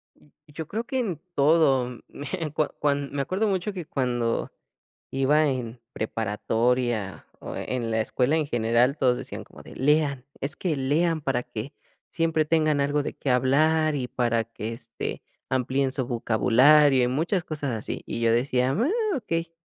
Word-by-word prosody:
Mm. - - -24 0.2
Yo 155 +1 -7
creo 225 +3 -3
que 260 +2 -3
en 190 - -2
todo, 140 -5 +3
me 155 +2 -5
cua 150 0 +1
cuan 140 -1 0
me 140 - -1
acuerdo 195 +9 0
mucho 190 +1 -1
que 180 -5 -6
cuando 120 -3 -1 0.6
iba 145 +3 +3
en 120 -3 -3
preparatoria 110 0 -1
o - - -7
e - - -4
en 120 -2 -2
la 110 0 +1
escuela 125 +7 +1
en 155 - 0
general, 120 +1 +2
todos 125 -2 +3
decían - - -7
como - - -15
de: - - -12
"Lean, 140 -2 +1
es 145 +5 -4
que 170 -5 -1
lean 155 +5 +1
para 135 -4 -1
que 125 +2 -7 0.4
siempre 165 -2 +1
tengan 155 -2 +2
algo 145 +1 +1
de - - -5
qué 135 - -3
hablar 155 +5 +3
y 130 -3 -2
para 120 -2 0
que, 115 0 -6
este, 115 - -6 0.3
amplíen 130 +1 0
su 130 -3 -2
vocabulario", 130 +4 +4
y - - +1
muchas 165 +7 0
cosas 150 -3 -3
así, 110 - -5
y - - -4
yo 115 -1 +3
decía: 125 +1 +1
"Oh, 405 - +1
okey", 165 -8 -3
140 Hz, 170 wpm, -26 LUFS, 125-155 Hz, 0.6 s, vocabulario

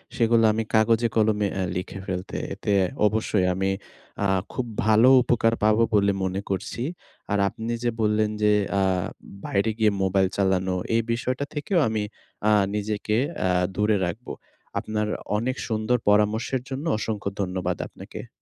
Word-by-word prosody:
সেগুলো 115 -1 +3
আমি 110 +1 -1
কাগজে-কলমে 110 -2 +3
অ্যা 95 - -1
লিখে 90 +2 -4
ফেলতে। 90 0 -4 0.2
এতে 105 - -3 0.4
অবশ্যই 105 -3 +1
আমি 95 +1 0 0.6
আ - - +3 0.3
খুব 130 - -2 0.2
ভালো 110 +3 +5
উপকার 115 -2 +2
পাবো 110 +1 +4
বলে 100 -1 +4
মনে 95 +1 -1
করছি। 100 +4 -3 0.5
আর 105 - +2
আপনি 115 +1 -5
যে 120 - +2
বললেন 105 0 +2
যে 105 0 +4 0.3
আ - - +2 0.6
বাইরে 100 +3 +1
গিয়ে 110 -2 +3
মোবাইল 95 0 +2
চালানো 95 -1 +1 0.2
এই 115 - +4
বিষয়টা 125 +4 -1
থেকেও 165 +5 0
আমি 110 -1 -1 0.5
আ - - +5 0.2
নিজেকে 105 0 -1 0.6
দূরে 105 0 +2
রাখব। 100 +8 -5 0.5
আপনার 105 -1 -2 0.3
অনেক 130 +4 -1
সুন্দর 110 +2 +1
পরামর্শের 110 +5 +2
জন্য 135 +4 -4
অসংখ্য 110 -2 -3
ধন্যবাদ 90 -2 -2
আপনাকে। - - -10
105 Hz, 140 wpm, -25 LUFS, 100-115 Hz, 0.6 s, ভালো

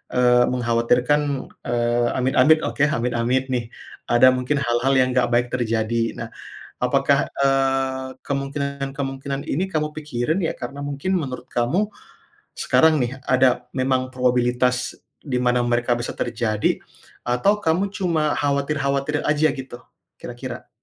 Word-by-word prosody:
eee, 125 -1 +5
mengkhawatirkan, 125 +3 +2 0.5
eee, 120 0 +1
amit-amit 135 +5 +4
oke, 140 - -1
amit-amit 120 +2 0
nih 120 -2 0 0.5
ada 120 +2 +7
mungkin 125 +3 -1
hal-hal 120 +3 +1
yang 130 - +4
enggak 125 -1 +2
baik 120 +1 +3
terjadi. 115 -2 -1 0.3
Nah - - -4 0.6
apakah, - - +3 0.2
eee, 135 -1 +1 0.2
kemungkinan-kemungkinan 140 -1 -3
ini 170 +7 0
kamu 150 -1 0
pikirin 150 +1 -2
ya - - 0
karena 140 +3 -6
mungkin 145 +7 -1
menurut 130 -6 -5
kamu 165 - +1 0.8
sekarang 160 0 +4
nih 120 - -2 0.2
ada 130 0 +3
memang 130 0 +1
probabilitas 125 -1 +1 0.3
di 135 -4 -2
mana 125 0 +2
mereka 120 0 0
bisa 120 - -4
terjadi 115 -3 -1 0.5
atau 125 +13 +2
kamu 190 +1 0
cuma 165 -6 0
khawatir-khawatir 140 0 0
aja 155 +1 +3
gitu 130 -2 -8 0.4
kira-kira? - - -7
130 Hz, 125 wpm, -22 LUFS, 120-140 Hz, 0.8 s, ada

